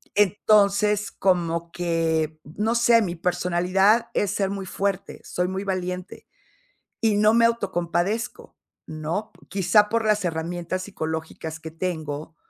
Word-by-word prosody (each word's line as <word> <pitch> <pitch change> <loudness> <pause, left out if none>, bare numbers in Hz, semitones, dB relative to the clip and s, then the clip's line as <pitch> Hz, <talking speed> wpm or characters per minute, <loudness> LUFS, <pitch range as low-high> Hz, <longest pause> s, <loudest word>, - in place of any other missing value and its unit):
entonces 205 +1 +3
como 170 -3 0
que, 160 -2 -1
no 210 +10 -2
sé, 235 -1 +5
mi 175 - -2
personalidad 180 +5 +2
es 200 -2 +1
ser 195 -2 0
muy 195 -1 -4
fuerte, 195 0 -3
soy 180 0 -2
muy 190 +1 -3
valiente 185 -1 -4 0.7
y 220 -3 +2
no 210 +1 +4
me 230 0 +5
autocompadezco, 200 0 -1 0.3
¿no?, 160 +8 -4 0.2
quizá 205 +2 +3
por 230 +1 0
las 210 -2 +2
herramientas 175 +2 -3
psicológicas 160 -3 -5
que 160 0 -7
tengo 160 -3 -4
185 Hz, 125 wpm, -24 LUFS, 170-210 Hz, 0.7 s, sé